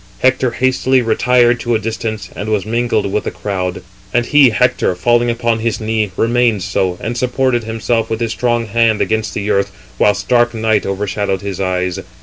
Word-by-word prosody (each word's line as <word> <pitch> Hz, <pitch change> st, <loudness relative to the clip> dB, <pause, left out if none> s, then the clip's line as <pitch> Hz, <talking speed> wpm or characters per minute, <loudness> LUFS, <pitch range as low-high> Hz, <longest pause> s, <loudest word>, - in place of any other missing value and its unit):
Hector 130 Hz, 0 st, +2 dB
hastily 130 Hz, +1 st, +1 dB
retired 120 Hz, +1 st, +3 dB
to 120 Hz, -1 st, 0 dB
a -, -, +1 dB
distance, 110 Hz, -3 st, -4 dB
and 105 Hz, -, -5 dB
was 105 Hz, -3 st, 0 dB
mingled 115 Hz, -3 st, 0 dB
with 105 Hz, -, -1 dB
the -, -, -1 dB
crowd. 90 Hz, -3 st, -4 dB, 0.3 s
And 120 Hz, -1 st, +1 dB
he 145 Hz, -1 st, +5 dB
(Hector) 120 Hz, -5 st, +1 dB
falling 120 Hz, +6 st, +2 dB
upon 115 Hz, -1 st, 0 dB
his 110 Hz, -2 st, -1 dB
knee, 110 Hz, -1 st, -1 dB
remained 115 Hz, -4 st, +2 dB
so, 95 Hz, -2 st, -1 dB
and 115 Hz, +2 st, -4 dB
supported 125 Hz, -1 st, 0 dB
himself 115 Hz, +1 st, -1 dB
with 110 Hz, -, -2 dB
his 115 Hz, -2 st, -1 dB
strong 120 Hz, -1 st, 0 dB
hand 115 Hz, 0 st, +2 dB
against 110 Hz, 0 st, -1 dB
the 105 Hz, +1 st, -1 dB
earth, 100 Hz, -1 st, +1 dB, 0.3 s
whilst 100 Hz, -2 st, +2 dB
dark 120 Hz, -1 st, +3 dB
night 110 Hz, -2 st, +1 dB
overshadowed 100 Hz, 0 st, -2 dB
his 100 Hz, -2 st, -5 dB
eyes. 90 Hz, -1 st, -1 dB
110 Hz, 180 wpm, -16 LUFS, 100-120 Hz, 0.3 s, he